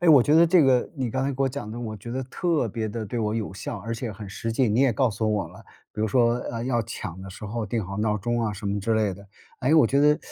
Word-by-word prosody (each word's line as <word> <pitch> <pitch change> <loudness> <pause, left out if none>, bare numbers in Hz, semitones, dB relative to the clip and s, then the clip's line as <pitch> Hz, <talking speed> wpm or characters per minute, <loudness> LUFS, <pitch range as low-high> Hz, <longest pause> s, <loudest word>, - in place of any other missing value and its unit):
哎， 175 - +2
我 145 -5 +8
觉 145 - +3
得 170 +1 +7
这 170 0 +5
个 130 -3 +3
你 125 -4 -2
刚 130 - -1
才 135 - 0
给 135 0 -1
我 135 - +3
讲 125 -5 -6
的， 115 - -6
我 110 -3 -5
觉 115 +4 -9
得 130 +2 -2
特 155 +1 0
别 110 +1 -3
地 110 +1 -4
对 115 +4 -4
我 105 -1 0
有 110 -4 -3
效， 100 +4 -5
而 115 +4 -4
且 115 -1 -4
很 105 0 -8
实 115 +3 -4
际。 120 +2 +2
你 115 +5 +2
也 135 - +5
告 120 +2 +2
诉 110 +1 -1
我 105 -5 0
了， 90 +7 -14 0.3
比 105 - -5
如 110 - +1
说， 120 +1 +3
呃， 115 0 -4
要 120 -2 +1
抢 95 -5 -7
的 95 - -8
时 95 +3 -9
候 110 +1 -3
定 110 0 -2
好 100 +2 -6
闹 105 0 +1
钟 120 +3 -1
啊 110 -2 -1
什 100 - -9
么 100 0 -1
之 110 +3 +1
类 105 -2 +1
的。 100 +2 -12 0.3
诶， 135 +5 +3
我 155 -7 +6
觉 140 +4 +2
得 150 +1 +5
115 Hz, 330 characters per minute, -25 LUFS, 105-130 Hz, 0.3 s, 我